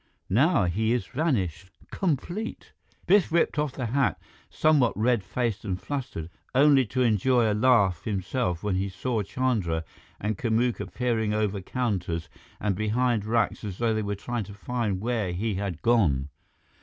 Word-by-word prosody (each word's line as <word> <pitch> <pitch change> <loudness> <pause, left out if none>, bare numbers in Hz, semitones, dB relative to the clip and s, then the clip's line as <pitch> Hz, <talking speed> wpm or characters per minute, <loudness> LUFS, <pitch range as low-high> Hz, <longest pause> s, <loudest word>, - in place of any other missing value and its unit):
Now 135 - +4
he 110 +6 +1
is 125 - -1
vanished. 95 - -1 0.2
Complete." 185 - -3 0.3
Biff 195 -2 +4
whipped 165 -2 +2
off 150 -3 0
the 130 - -4
hat, 135 +5 +1 0.3
somewhat 150 -6 +3
red 115 -1 +2
faced 115 +2 -2
and 95 -3 -3
flustered, 130 - -5 0.2
only 135 -2 +5
to 130 +4 0
enjoy 115 +1 +3
a - - +2
laugh 105 -7 +3
himself 100 -2 -1
when 100 -3 0
he 100 +1 -1
saw 110 +4 -2
Chandra 100 -8 -1 0.4
and 105 -1 -2
Kamuka 120 +1 0
peering 115 -4 0
over 105 -2 0
counters 90 -8 -2 0.3
and 105 -3 0
behind 110 +1 +1
racks 115 0 0
as 100 -3 -5
though 115 -1 +1
they 110 - 0
were 100 -1 -2
trying 115 +2 -4
to 100 +1 -10
find 105 -3 -2
where 110 -6 -1
he 105 +5 -1
had 95 -4 -4
gone. 80 - +3
110 Hz, 155 wpm, -27 LUFS, 95-125 Hz, 0.4 s, only